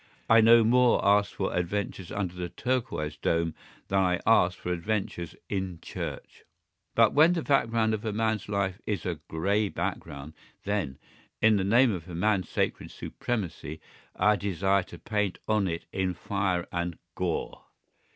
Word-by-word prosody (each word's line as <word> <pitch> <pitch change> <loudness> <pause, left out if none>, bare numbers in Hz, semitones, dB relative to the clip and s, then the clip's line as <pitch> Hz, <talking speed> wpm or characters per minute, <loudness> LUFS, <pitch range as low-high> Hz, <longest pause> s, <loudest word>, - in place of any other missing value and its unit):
I 115 0 +7
no 115 +1 +7
more 125 +2 +4
ask 100 0 +4
for 95 - -2
adventures 90 0 -2
under 95 -4 -2
that 90 -1 -6
turquoise 120 -12 -1
dome 85 -1 0 0.3
than 95 - +2
I 90 -2 +2
ask 90 -5 +4
for 90 - -3
adventures 90 -2 -3
in 95 -3 -3
church. - - -7 0.5
But 115 -2 +5
when 160 +4 +6
the 165 -3 -1
background 115 -5 +2
of 110 - -3
man's 110 -2 0
life 100 0 -1
is 100 -5 -2
a 85 -4 -2
grey 100 +6 0
background, 70 -3 -5 0.3
then, 100 -10 -2 0.4
in 110 -1 +5
the 95 - 0
name 120 +5 +5
of 90 -4 -5
man's 95 +2 0
sacred - - -1
supremacy, 85 - -4 0.4
I 105 0 +3
desire 100 0 +1
to - - -11
paint 105 -4 -1
on 105 -3 +2
it 85 -1 -4
in 95 -1 -1
fire 95 -1 -1
and 85 -1 -2 0.2
gore. 90 -2 -3
100 Hz, 150 wpm, -28 LUFS, 90-110 Hz, 0.5 s, I